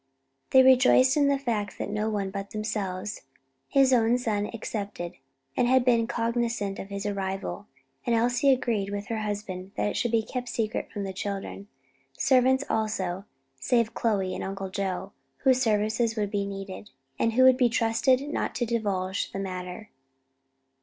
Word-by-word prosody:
They 260 0 +7
rejoiced 260 0 +6
in 290 -2 +4
the 280 0 +3
fact 225 -7 -2
that - - -3
no 210 +1 -1
one 200 -3 -2
but 200 0 -5
themselves 210 -2 -3 0.5
his 270 -1 +4
own 235 0 +4
son 210 -4 -1
excepted 205 -6 -5 0.4
had 250 +1 +3
been 235 -2 +3
cognizant 230 -4 -1
of 195 - -7
his 200 +1 -5
arrival, 195 0 -3 0.4
and 235 - +1
Elsie 245 +4 +2
agreed 230 -6 0
with 205 0 -4
her 225 -1 -1
husband 200 -3 -5
that - - 0
it - - -4
should 240 - 0
be 225 -1 +2
kept 250 +1 -5
secret 220 -1 -2
from 205 - -4
the 190 -1 -4
children; 200 +1 -5 0.5
servants 260 +1 +4
also 200 -4 -1 0.3
save 230 - +2
Aunt - - -31
Chloe 200 -5 0
and - - -4
Uncle 195 0 -4
Joe, 195 0 -3 0.3
whose 260 -1 +4
services 220 +1 +1
would 205 -2 -1
be 200 -2 -1
needed, 195 +1 -7 0.3
and 230 - +2
who 255 +3 +5
could 260 -1 +7
be 250 -2 +4
trusted 235 +3 +2
not 290 -5 -3
to 240 +1 0
divulge 200 -5 -1
the - - -5
matter. 185 +1 -6
215 Hz, 165 wpm, -27 LUFS, 200-240 Hz, 0.5 s, They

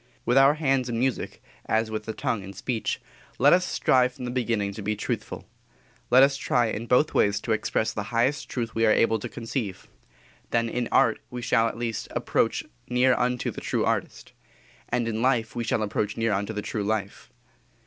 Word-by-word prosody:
With 120 - +2
our 135 +2 +6
hands 135 -5 +1
in 115 - -2
music, 130 +1 -2 0.2
as 110 0 +1
with 110 -1 -4
the 110 - -4
tongue 110 0 -2
in 95 +1 -9
speech, 110 +4 -2 0.4
let 140 +3 +6
us 180 +1 +4
strive 125 -7 +2
from 125 - -7
the 125 - -3
beginning 115 -5 -1
to 105 - -7
be 105 +2 -1
truthful. 105 - -4 0.6
Let 130 +2 +7
us 135 0 +3
try 120 -3 +1
in 115 +3 -4
both 125 +6 +3
ways 100 0 +2
to 115 - -3
express 110 0 0
the 105 - -3
highest 120 +5 0
truth 115 -3 -3
we 115 0 +2
are - - +5
able 110 0 +3
to - - -6
conceive. 115 -4 -5 0.6
Then 115 0 +1
in 120 0 -2
art 115 - +3
we 125 -1 -6
shall, 115 -1 +3
at 115 - -5
least, 115 -2 -3
approach - - 0 0.3
near 125 +1 +4
unto 125 0 0
the - - -8
true - - 0
artist; - - -2 0.6
and 120 -1 0
in 110 0 -2
life 120 -3 +1
we 120 - -2
shall 110 -1 0
approach 105 0 -2
near 115 -1 +1
unto 100 +2 -1
the 105 -1 -4
true 105 - -3
life. 100 -1 -3
115 Hz, 200 wpm, -26 LUFS, 110-125 Hz, 0.6 s, Let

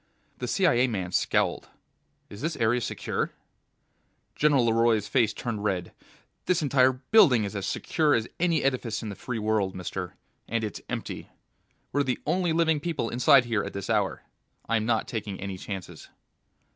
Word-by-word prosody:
The - - -3
CIA 140 -10 +3
man 95 -7 -3
scowled. - - 0 0.6
"Is 100 - -11
this 160 +1 -2
area 115 +2 +1
Secure?" - - -3 1.0
General 140 -5 +3
LeRoy's 115 -2 +2
face 115 -5 +2
turned 110 -2 -4
red. 95 -4 -2 0.5
"This 180 -3 +2
entire 130 -2 +4
building 130 - +4
is 100 0 -4
as 100 -1 -3
Secure 155 -3 +1
as 115 0 -1
any 170 -3 +2
edifice 125 -5 -1
in 110 - -4
the 100 - -6
Free 115 +3 -5
World, 105 -3 0
mister. 90 -2 -5 0.3
And 115 0 -1
it's 105 - -4
empty. - - -5 0.6
We're 145 - +2
the 130 -3 0
only 175 +2 +1
living 160 -1 +2
people 145 -7 -2
inside 125 +2 +5
here 110 -3 0
at - - -6
this 100 +3 -4
hour. 105 -3 0 0.4
I'm 110 -1 0
not 115 -2 +1
taking 105 -4 -5
any 95 -1 -5
chances." 95 -3 -7
115 Hz, 160 wpm, -27 LUFS, 105-140 Hz, 1.0 s, inside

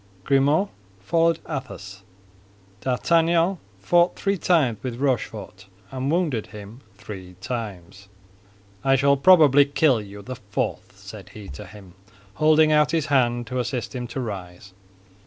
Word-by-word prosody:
Grimaud 145 - +2 0.3
followed 165 - +2
Athos. 100 - -7 0.8
D'Artagnan 165 - +2 0.2
fought 175 - +2
three 195 0 0
times 155 - +1
with 125 -2 -5
Rochefort, 110 -7 -3 0.2
and 130 +1 -3
wounded 155 - 0
him 105 +4 -11
three 95 -3 -10
times. 100 -5 -6 0.8
"I 135 0 +4
shall 140 +1 +4
probably 145 -2 +6
kill 140 -4 +2
you 100 0 -11
the 130 +2 -7
fourth," 100 -2 -4
said - - -11
he 105 -2 -10
to 70 - -9
him, 95 -4 -14 0.4
holding 155 +5 +4
out 150 -1 +4
his 160 -1 0
hand 120 -2 +2
to 125 +3 -3
assist 125 -2 -3
him 125 -2 -4
to 120 +3 -6
rise. 95 -5 -7
130 Hz, 135 wpm, -23 LUFS, 105-155 Hz, 0.8 s, probably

